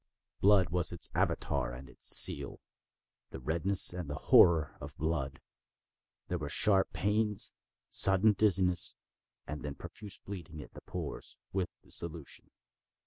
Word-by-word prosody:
Blood 95 -3 +3
was 90 0 0
its 85 -1 -2
Avatar 65 -3 -2
and 65 +2 -11
its 65 - -2
seal—the - - 0
redness 85 +8 +3
and 90 -4 -7
the 75 - -5
horror 80 +1 +3
of - - -10
blood. 75 -4 -3 0.9
There 90 - -4
were 75 -2 -6
sharp 95 +4 +2
pains, 105 0 -2 0.4
and - - -25
sudden 95 +3 +4
dizziness, 95 -4 +3 0.5
and 75 +1 -7
then 70 -1 -7
profuse 95 +5 -8
bleeding 85 -5 -10
at - - -18
the - - -12
pores, - - -7 0.2
with 95 -2 -2
dissolution. 85 -3 -4
85 Hz, 135 wpm, -31 LUFS, 75-95 Hz, 0.9 s, sudden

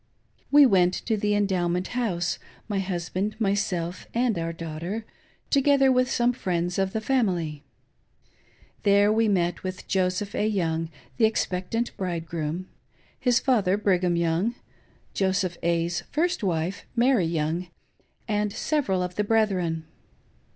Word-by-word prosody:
We 290 0 +8
went 185 -6 +4
to 225 - -1
the 210 0 +1
Endowment 185 -3 0
House 185 -9 -1
— - - -28
my 205 -3 -1
husband, 190 +3 -3
myself, 195 -4 -1
and 240 -2 +2
our 165 0 -2
daughter, 165 +6 -5 0.5
together 275 -1 +4
with 255 0 +2
some 245 -1 +2
friends 180 -5 -1
oi 195 - +3
the 190 +3 -3
family. 180 - 0 1.2
There 205 0 +4
we 225 0 +3
met 175 -4 +1
with 185 0 -6
Joseph 190 +1 0
A. 210 - +1
Young, 165 -6 -1 0.3
the 230 - +5
expectant 220 +2 -1
bridei 175 -4 -3
groom; 165 +2 -4 0.5
his 245 -1 +3
father, 205 -7 +2
Brigham 180 -4 +2
Young; 170 +7 +1 0.6
Joseph 190 -2 0
A,'s 170 0 0
first 340 0 0
wife—, 175 +1 -1
Mary 240 -7 +3
Young; 165 +2 -1 0.6
and 210 -1 0
several 200 -10 0
of 180 0 -4
the 210 - +2
brethren. 190 -7 +1
190 Hz, 135 wpm, -26 LUFS, 175-220 Hz, 1.2 s, We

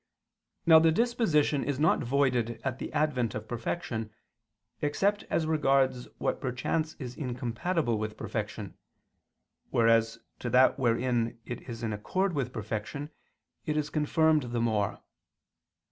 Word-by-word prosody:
Now 160 -1 +9
the 165 0 +4
disposition 165 - +2
is 145 -1 -2
not 155 +2 +4
voided 125 -3 +1
at 130 -1 -2
the - - -5
advent 145 -6 0
of 110 0 -5
perfection, 120 -1 -3 0.7
except 195 +8 +1
as 160 - +1
regards 135 -5 +2
what - - -1
perchance 135 +5 -1
is 125 -3 -7
incompatible 125 0 -1
with 110 0 -4
perfection, - - -5 0.9
whereas 115 0 +3
as 115 - -25 0.2
to 120 - -3
that 130 +3 +5
wherein 120 -1 +1
it 120 - -6
is 115 -1 -6
in 110 -2 -1
accord 185 - -1
with 135 -4 -1
perfection, 110 +7 -5 0.6
it 150 0 0
is 150 0 -1
confirmed 155 0 +3
the 120 - -1
more. 110 -4 0
130 Hz, 135 wpm, -29 LUFS, 115-155 Hz, 0.9 s, Now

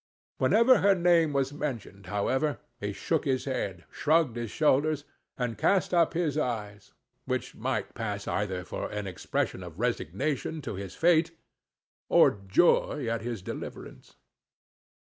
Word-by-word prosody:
Whenever 225 - +5
her 200 -1 +5
name 170 -3 +4
was 135 0 0
mentioned, 120 -9 -5
however, 130 +8 0 0.2
he 105 -1 -3
shook 160 +9 -1
his 130 -2 0
head, 100 -10 -3
shrugged 155 -4 +2
his 120 -2 -4
shoulders, 150 +1 +2 0.3
and 120 -3 -3
cast 190 -2 +2
up 170 -1 +3
his 155 -4 0
eyes; 105 -7 -4 0.3
which - - -2
might - - -3
pass - - -4
either 95 -3 -2
for - - -4
an 105 -1 -4
expression 95 -2 -2
of - - -10
resignation 140 - -1
to 140 - -5
his 95 -1 -7
fate, 165 -1 +3 0.7
or - - +6 0.2
joy 150 - +3
at 115 -1 -1
his 115 -4 -5
deliverance. - - -8
135 Hz, 140 wpm, -28 LUFS, 105-160 Hz, 0.7 s, or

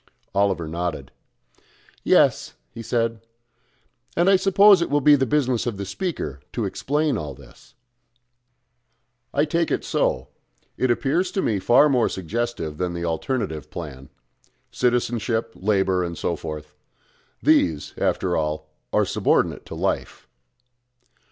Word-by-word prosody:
Oliver 100 -4 +1
nodded. 85 0 -4 0.9
"Yes," - - +3 0.2
he 115 - -8
said. 115 -1 -1 1.0
"And 175 +3 +4
I - - +7
suppose 195 0 +6
it 170 - -1
will 145 - +2
be 145 +1 +6
the 135 -2 0
business 130 -3 +1
of 115 -5 -2
the 100 - -4
speaker 95 - -4
to 115 - -1
explain 145 +6 -1
all 75 -4 -6
this." 70 -1 -18 1.6
"I 145 +2 +2
take 165 +2 0
it - - -1
so. - - 0 0.5
It 130 - 0
appears 145 +9 +1
to 195 - 0
me 105 -3 0
far 125 +9 +5
more 125 -5 +2
suggestive 95 -4 -3
than 90 -1 -2
the 85 0 -3
alternative 80 - -3
plan 70 -6 -8 0.6
Citizenship, 120 -2 0
Labour, 95 -3 +1
and 85 -1 -5
so 85 - -1
forth. 75 -1 -7 0.7
These, 80 -4 +2
after 90 -2 0
all, 75 0 -2 0.2
are - - +3
subordinate - - 0
to - - -7
Life." - - -3
110 Hz, 130 wpm, -23 LUFS, 85-135 Hz, 1.6 s, I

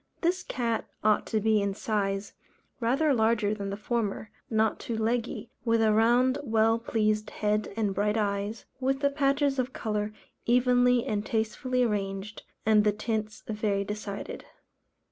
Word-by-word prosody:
This 360 +2 +1
cat 235 -9 -2 0.2
ought 215 0 +3
to 220 - 0
be, 215 0 +3
in 200 -1 -1
size, 200 -2 -2 0.5
rather 275 +6 +2
larger 220 -3 +2
than 200 -2 -4
the 200 - -4
former, 215 -1 -2 0.2
not 220 -2 +1
too 230 - -4
leggy, 230 +2 -1
with 230 -1 +2
a 220 -1 +4
round 245 +5 +3
well 225 -3 +2
pleased 215 -2 0
head 210 0 -1
and 210 -3 +1
bright 210 +2 +1
eyes, 205 +1 -2
with 270 +1 0
the 280 -1 +3
patches 280 -1 +1
of 255 +1 -1
colour 210 -1 -2 0.4
evenly 245 0 +4
and 210 -5 -1
tastefully 235 +4 0
arranged, 200 -1 -2 0.2
and 215 -1 +5
the 210 - +4
tints 215 0 -3
very 210 -2 0
decided. 205 0 -6
220 Hz, 150 wpm, -28 LUFS, 210-245 Hz, 0.5 s, and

